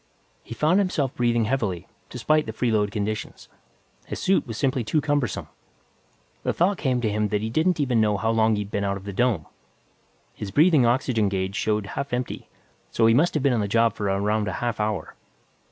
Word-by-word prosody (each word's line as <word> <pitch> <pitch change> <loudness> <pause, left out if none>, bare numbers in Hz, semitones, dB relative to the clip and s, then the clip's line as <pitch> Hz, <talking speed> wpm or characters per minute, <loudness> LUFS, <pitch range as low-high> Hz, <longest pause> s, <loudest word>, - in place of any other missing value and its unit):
He 115 - -8
found 160 - +3
himself 155 -9 0
breathing 120 -2 +1
heavily, 105 -8 -1 0.2
despite 155 +5 +1
the 110 - -4
freeload 110 -3 +1
conditions. 105 +1 -4 0.6
His - - -5
suit 190 -6 +1
was 115 -2 -6
simply 130 -1 0
too 135 +8 +1
cumbersome. 145 -4 -1 0.9
The - - -1
thought 185 +3 +1
came 130 -4 0
to 110 -3 0
him 105 0 0
that 105 0 -1
he 110 - -3
didn't 160 +6 +1
even 125 -6 +2
know 105 -1 +2
how 110 +3 0
long 110 -1 +3
he'd 105 -1 -4
been 100 - -1
out 100 0 -1
of 95 - -11
the 100 0 -6
dome. 110 -7 +1 0.9
His 105 - -6
breathing 150 - +4
oxygen 120 -4 +1
gauge 95 0 -2
showed 105 0 0
half 125 +6 -5
empty, 125 0 -4 0.4
so 115 - +1
he 115 - +5
must 160 +8 +2
have 150 - 0
been 140 -3 +3
on 120 - +1
the 100 - -1
job 115 +1 +2
for 105 - -5
around 105 +2 0
a 95 - -2
half 120 -3 -3
hour. 105 -5 -2
115 Hz, 200 wpm, -24 LUFS, 105-130 Hz, 0.9 s, he